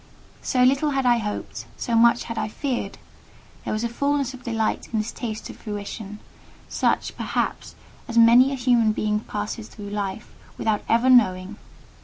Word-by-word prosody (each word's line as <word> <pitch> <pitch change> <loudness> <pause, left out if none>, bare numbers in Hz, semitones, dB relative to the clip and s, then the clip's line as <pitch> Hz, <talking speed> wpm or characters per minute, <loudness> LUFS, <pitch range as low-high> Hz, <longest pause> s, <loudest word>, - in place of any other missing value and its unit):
So 250 -1 +1
little 275 +4 +3
had 265 - 0
I 240 -1 +4
hoped, 210 -2 -5
so 235 - -3
much 235 +1 +5
had 230 - -6
I 220 - -2
feared; 255 +3 -3 0.7
there - - -4
was 215 +1 -1
a - - +1
fulness 280 +2 -1
of 260 - -11
delight 225 -2 -1
in 225 - -1
this 215 +2 -2
taste 220 -4 -5
of - - -14
fruition—such, 210 -1 -4
perhaps, - - -3 0.3
as 235 - -4
many 235 +3 +7
a - - -1
human 240 -4 +3
being 210 0 0
passes 210 +1 -5
through 205 -3 -9
life 205 0 -4 0.2
without 215 -2 0
ever 235 +3 +3
knowing. 205 -5 +4
230 Hz, 165 wpm, -24 LUFS, 210-245 Hz, 0.7 s, many